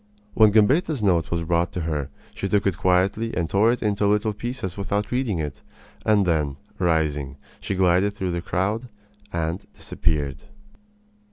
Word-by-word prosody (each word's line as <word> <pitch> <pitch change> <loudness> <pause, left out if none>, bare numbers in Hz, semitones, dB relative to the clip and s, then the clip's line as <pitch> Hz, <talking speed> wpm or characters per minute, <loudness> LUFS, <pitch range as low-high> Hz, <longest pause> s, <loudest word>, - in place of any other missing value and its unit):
When 110 -1 +6
Gambetta's 130 - +3
note 85 -5 +2
was 85 -1 -1
brought 85 +1 +1
to 90 - -3
her 75 -4 -2 0.2
she 100 - -3
took 100 0 +2
it 100 -3 +2
quietly 95 +5 +1
and 85 -2 0
tore 105 +6 +3
it 120 - -2
into 105 -1 +1
little 105 +1 +2
pieces 105 -4 -5
without 100 +1 -2
reading 125 -6 0
it; 75 -3 -4 0.4
and 105 -2 +3
then, 75 -5 0 0.2
rising, 75 -5 0 0.2
she 100 - -2
glided 95 +2 +3
through 95 -3 -2
the 85 0 -2
crowd 100 +9 -1 0.4
and 85 +2 -2
disappeared. 70 -4 -2
95 Hz, 160 wpm, -24 LUFS, 80-105 Hz, 0.4 s, When